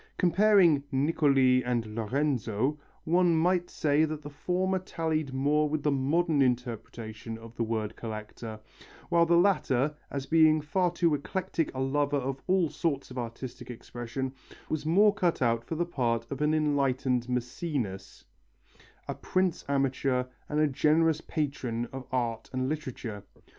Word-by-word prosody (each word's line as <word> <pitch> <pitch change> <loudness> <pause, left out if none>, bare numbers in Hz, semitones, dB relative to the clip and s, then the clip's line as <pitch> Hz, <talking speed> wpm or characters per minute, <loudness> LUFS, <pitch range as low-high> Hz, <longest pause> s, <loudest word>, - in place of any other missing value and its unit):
Comparing 180 -5 +4
Niccoli 135 -3 +3
and 120 -3 -2
Lorenzo, 130 +2 0 0.2
one 175 +1 +3
might 175 +2 +2
say 150 -1 +2
that 155 -1 -2
the 145 - -8
former 185 +5 0
tallied 160 -5 -2
more 145 +3 +2
with 150 -1 -2
the 150 - +2
modern 145 +3 +2
interpretation 115 -3 -2
of 115 +1 -12
the - - -4
word 110 -1 -2
collector, 110 0 -7 0.5
while 170 -1 +4
the 170 0 +5
latter, 150 -7 +2 0.2
as 140 -1 -4
being 155 0 +5
far 175 +5 +1
too 170 -2 +1
eclectic 165 +3 -2
a - - -3
lover 145 +2 +1
of 135 0 -3
all 185 -2 +3
sorts 145 -4 -2
of 125 - -5
artistic 125 +1 -7
expression, 120 +2 -5 0.4
was 155 -1 -2
more 200 +5 +5
cut 180 -4 0
out 115 -2 +1
for 160 - -5
the 175 +2 0
part 120 -8 -1
of 140 +1 -4
an 150 +1 +3
enlightened 135 -5 +1
Mæcenas, 125 - -3 0.8
a - - -2
prince 185 -2 -1
amateur 135 -2 +1 0.3
and 150 - 0
a 155 - +5
generous 155 +3 +2
patron 130 -6 -2
of 135 -1 -7
art 120 -3 -2
and 130 0 -1
literature. 130 -8 -4
140 Hz, 150 wpm, -29 LUFS, 125-160 Hz, 0.8 s, the